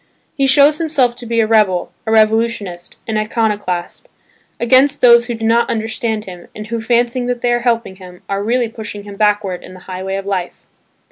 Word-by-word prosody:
He 275 -2 +1
shows 290 +3 +5
himself 275 -7 +1
to 240 - -9
be 230 0 +1
a - - +2
rebel, 210 -5 +2 0.2
a - - 0
revolutionist, 220 -5 0
an 220 -1 -1
iconoclast, 215 - -2 0.5
against 260 +4 +3
those 235 -1 +6
who 240 - -3
do 225 0 -4
not 230 +1 +2
understand 220 -1 -2
him 180 -2 -10
and 215 - -7
who, 230 0 -4
fancying 240 +2 0
that 245 -1 -2
they 245 - +1
are 240 - +1
helping 230 -5 -1
him, 180 -1 -13
are 200 0 -2
really 240 +2 +1
pushing 215 -2 -8
him 205 0 -10
backward 205 -3 0
in 185 - -12
the 185 - -13
highway 190 +1 -5
of 195 0 -4
life. 190 -3 -4
220 Hz, 195 wpm, -17 LUFS, 200-240 Hz, 0.5 s, those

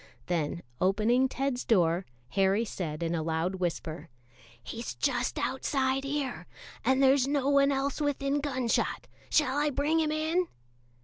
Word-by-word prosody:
Then 170 -1 -2 0.2
opening 220 +8 +3
Ted's 270 -1 -2
door, 175 -4 +2 0.2
Harry 195 - +2
said 170 -6 -4
in 165 0 -1
a 165 - 0
loud 165 +3 -1
whisper: 165 -3 -3 0.5
"He's 215 - -6
just 240 - 0
outside 265 0 0
here, 275 -2 -3 0.4
and 265 +1 +3
there's 270 0 +5
no 280 -1 +1
one 280 0 +4
else 275 +2 -1
within 285 0 0
gun 260 -4 -2
shot; - - 0 0.2
shall 290 -2 +2
I 295 0 +2
bring 295 +4 +1
him 310 -1 +1
in?" 320 +4 +1
260 Hz, 145 wpm, -29 LUFS, 185-280 Hz, 0.5 s, there's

